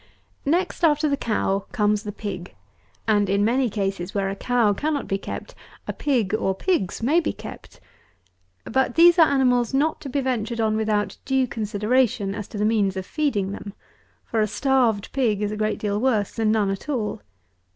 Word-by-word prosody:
139. 320 Hz, +5 st, +4 dB
Next 365 Hz, -1 st, -6 dB
after 305 Hz, -1 st, +4 dB
the 285 Hz, -, +1 dB
Cow 205 Hz, -6 st, -1 dB
comes 210 Hz, -2 st, +1 dB
the 210 Hz, -, -5 dB
Pig; 200 Hz, -4 st, -7 dB, 0.5 s
and, 205 Hz, -3 st, +3 dB
in 200 Hz, +1 st, +2 dB
many 250 Hz, +2 st, +2 dB
cases, 195 Hz, -3 st, -3 dB
where 195 Hz, -1 st, 0 dB
a -, -, -4 dB
cow 235 Hz, -1 st, +2 dB
cannot 290 Hz, +6 st, -2 dB
be 195 Hz, -, -1 dB
kept, -, -, -7 dB, 0.3 s
a -, -, -2 dB
pig 245 Hz, -9 st, 0 dB
or 195 Hz, -3 st, 0 dB
pigs 225 Hz, -, -1 dB
may 300 Hz, +8 st, +4 dB
be 325 Hz, -, -1 dB
kept. -, -, -11 dB, 0.9 s
But 265 Hz, +2 st, 0 dB
these 345 Hz, +1 st, +7 dB
are 325 Hz, -, +8 dB
animals 250 Hz, -2 st, +2 dB
not 305 Hz, +3 st, +1 dB
to 280 Hz, -, -6 dB
be 280 Hz, -, -1 dB
ventured 240 Hz, -3 st, -2 dB
on 220 Hz, -1 st, +1 dB
without 215 Hz, -1 st, 0 dB
due 265 Hz, -1 st, +1 dB
consideration 215 Hz, -1 st, 0 dB
as 205 Hz, 0 st, -6 dB
to 215 Hz, -, -8 dB
the 210 Hz, -, +1 dB
means 205 Hz, -3 st, +1 dB
of 190 Hz, -, -4 dB
feeding 215 Hz, -9 st, -1 dB
them; 200 Hz, 0 st, -8 dB, 0.5 s
for 225 Hz, -, 0 dB
a 215 Hz, -, +2 dB
starved 245 Hz, -4 st, +1 dB
pig 220 Hz, -6 st, +1 dB
is 205 Hz, -, -1 dB
a -, -, -3 dB
great 215 Hz, 0 st, -1 dB
deal 205 Hz, -1 st, -1 dB
worse 220 Hz, -5 st, +1 dB
than 220 Hz, -2 st, 0 dB
none 210 Hz, -3 st, +2 dB
at 195 Hz, +9 st, -6 dB
all. 230 Hz, -, -2 dB
220 Hz, 195 wpm, -23 LUFS, 205-265 Hz, 0.9 s, are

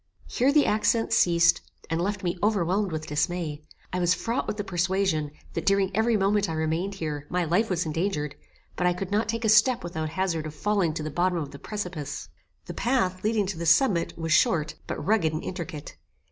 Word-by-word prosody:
Here 260 Hz, +3 st, +2 dB
the 295 Hz, 0 st, +4 dB
accents 225 Hz, +2 st, +2 dB
ceased, 170 Hz, 0 st, +4 dB, 0.3 s
and 165 Hz, +1 st, -1 dB
left 200 Hz, +2 st, -2 dB
me 175 Hz, -1 st, 0 dB
overwhelmed 200 Hz, -1 st, +1 dB
with 155 Hz, -1 st, -4 dB
dismay. 155 Hz, 0 st, -2 dB, 0.3 s
I 180 Hz, -, 0 dB
was 175 Hz, 0 st, +3 dB
fraught 230 Hz, +6 st, -2 dB
with 210 Hz, -, -3 dB
the 205 Hz, -, -2 dB
persuasion, 180 Hz, -4 st, 0 dB, 0.2 s
that -, -, -4 dB
during 195 Hz, -1 st, +2 dB
every 220 Hz, +1 st, +3 dB
moment 200 Hz, -1 st, +2 dB
I -, -, -2 dB
remained 160 Hz, +5 st, -1 dB
here, 150 Hz, -5 st, -4 dB
my 180 Hz, 0 st, 0 dB
life 180 Hz, +8 st, +1 dB
was 180 Hz, -2 st, 0 dB
endangered; 155 Hz, -2 st, -2 dB, 0.4 s
but 180 Hz, -, +1 dB
I 180 Hz, -, +3 dB
could 185 Hz, +2 st, -5 dB
not 210 Hz, +1 st, +1 dB
take 230 Hz, +1 st, -2 dB
a -, -, +3 dB
step 235 Hz, +3 st, +5 dB
without 160 Hz, -2 st, -3 dB
hazard 165 Hz, -2 st, -1 dB
of 155 Hz, -, -9 dB
falling 190 Hz, -2 st, 0 dB
to 155 Hz, -, -3 dB
the 155 Hz, -, -4 dB
bottom 175 Hz, +3 st, +1 dB
of 150 Hz, -4 st, -4 dB
the 140 Hz, -, -10 dB
precipice. 175 Hz, -8 st, -5 dB, 0.4 s
The -, -, -6 dB
path, 190 Hz, -8 st, 0 dB
leading 215 Hz, -1 st, +1 dB
to 190 Hz, -3 st, -4 dB
the 170 Hz, -, -2 dB
summit, 185 Hz, -, +3 dB
was 165 Hz, -1 st, 0 dB
short, 165 Hz, -11 st, +3 dB
but -, -, -4 dB
rugged 190 Hz, -7 st, +2 dB
and 155 Hz, -, -3 dB
intricate. 170 Hz, -4 st, -6 dB
180 Hz, 205 wpm, -26 LUFS, 160-205 Hz, 0.4 s, step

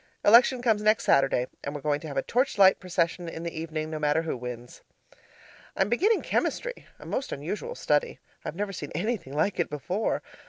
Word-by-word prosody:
Election 240 Hz, +3 st, +6 dB
comes 220 Hz, -4 st, +2 dB
next 215 Hz, +1 st, +3 dB
Saturday, 135 Hz, -2 st, +3 dB, 0.2 s
and 140 Hz, -, -4 dB
we're 145 Hz, -, -5 dB
going 145 Hz, 0 st, 0 dB
to 160 Hz, -, -8 dB
have 140 Hz, -, -6 dB
a 135 Hz, -, +1 dB
torchlight 220 Hz, -7 st, +4 dB
procession 175 Hz, -1 st, -1 dB
in 165 Hz, 0 st, -7 dB
the 170 Hz, -, -4 dB
evening, 160 Hz, -1 st, -4 dB
no 155 Hz, -, -3 dB
matter 150 Hz, +2 st, +2 dB
who 160 Hz, -, -2 dB
wins. 120 Hz, -1 st, -8 dB, 1.0 s
I -, -, +4 dB
am -, -, -4 dB
beginning 395 Hz, -, +2 dB
chemistry, -, -, -2 dB
a -, -, -13 dB
most 270 Hz, -, -3 dB
unusual 205 Hz, -, -4 dB
study. 485 Hz, -1 st, 0 dB, 0.3 s
I've -, -, -5 dB
never 200 Hz, +1 st, -3 dB
seen 145 Hz, -5 st, -6 dB
anything 180 Hz, -, -2 dB
like 170 Hz, +6 st, 0 dB
it 175 Hz, -, +1 dB
before. 180 Hz, +9 st, -2 dB
170 Hz, 195 wpm, -27 LUFS, 150-220 Hz, 1.0 s, Election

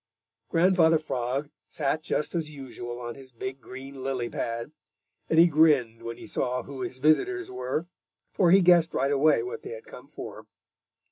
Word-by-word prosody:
Grandfather 165 Hz, -2 st, +4 dB
Frog 135 Hz, -1 st, -3 dB, 0.2 s
sat 150 Hz, +1 st, -1 dB
just 150 Hz, -, -1 dB
as 165 Hz, -3 st, -2 dB
usual 125 Hz, -4 st, -7 dB
on 120 Hz, -1 st, -5 dB
his 130 Hz, 0 st, -12 dB
big 130 Hz, +3 st, -6 dB
green 135 Hz, +2 st, -9 dB
lily 130 Hz, -3 st, -2 dB
pad, 115 Hz, +4 st, -3 dB, 0.6 s
and 160 Hz, -, +2 dB
he 165 Hz, -, +9 dB
grinned 145 Hz, -8 st, +3 dB
when 115 Hz, 0 st, -6 dB
he -, -, -10 dB
saw 125 Hz, -6 st, -2 dB
who 135 Hz, -2 st, -8 dB
his 125 Hz, +1 st, -4 dB
visitors 365 Hz, -, +2 dB
were, 275 Hz, -, -2 dB, 0.5 s
for 180 Hz, -, +3 dB
he 190 Hz, +3 st, +7 dB
guessed 170 Hz, -2 st, +5 dB
right 135 Hz, +2 st, +1 dB
away 145 Hz, +2 st, +4 dB
what 435 Hz, +4 st, -6 dB
they 410 Hz, -, -8 dB
had 485 Hz, -1 st, -10 dB
come 465 Hz, +2 st, -12 dB
for. -, -, -9 dB
145 Hz, 175 wpm, -27 LUFS, 130-170 Hz, 0.6 s, he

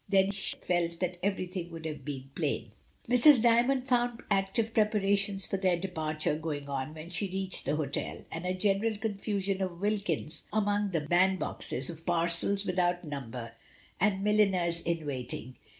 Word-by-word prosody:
Then 195 Hz, 0 st, +4 dB
she 200 Hz, 0 st, -1 dB
felt 170 Hz, -1 st, -1 dB
that 180 Hz, -1 st, -2 dB
everything 185 Hz, -2 st, -2 dB
would 165 Hz, -1 st, -8 dB
have 155 Hz, -3 st, -5 dB
been 135 Hz, -1 st, -6 dB
plain. -, -, -2 dB, 0.4 s
Mrs. 250 Hz, +2 st, +7 dB
Djnnond 240 Hz, +3 st, +3 dB
found 240 Hz, -2 st, +1 dB
active 200 Hz, +3 st, +1 dB
preparations 200 Hz, -2 st, +2 dB
for 195 Hz, -, -2 dB
their 185 Hz, -2 st, +2 dB
departure 160 Hz, -4 st, -1 dB
going 150 Hz, -3 st, -4 dB
on 140 Hz, +2 st, -3 dB
when 160 Hz, +2 st, -9 dB
she 180 Hz, +3 st, -1 dB
reached 190 Hz, 0 st, -2 dB
the 145 Hz, +3 st, +1 dB
hotel, 145 Hz, -3 st, -3 dB
and 165 Hz, +1 st, -5 dB
a 185 Hz, +1 st, -1 dB
general 205 Hz, +3 st, +1 dB
confusion 200 Hz, -2 st, -2 dB
of 180 Hz, -2 st, -3 dB
Wilkins 190 Hz, -6 st, -1 dB
among 205 Hz, -1 st, +1 dB
the 165 Hz, -4 st, 0 dB
band 180 Hz, +5 st, +3 dB
boxes, 130 Hz, -6 st, -3 dB
of 165 Hz, -1 st, -12 dB
parcels 170 Hz, +4 st, +2 dB
without 180 Hz, -1 st, +1 dB
number, 125 Hz, -6 st, -6 dB, 0.5 s
and 195 Hz, 0 st, +2 dB
milliners 190 Hz, -5 st, +3 dB
in 170 Hz, -2 st, -2 dB
waiting. 130 Hz, -2 st, -5 dB
185 Hz, 160 wpm, -30 LUFS, 160-205 Hz, 0.5 s, Mrs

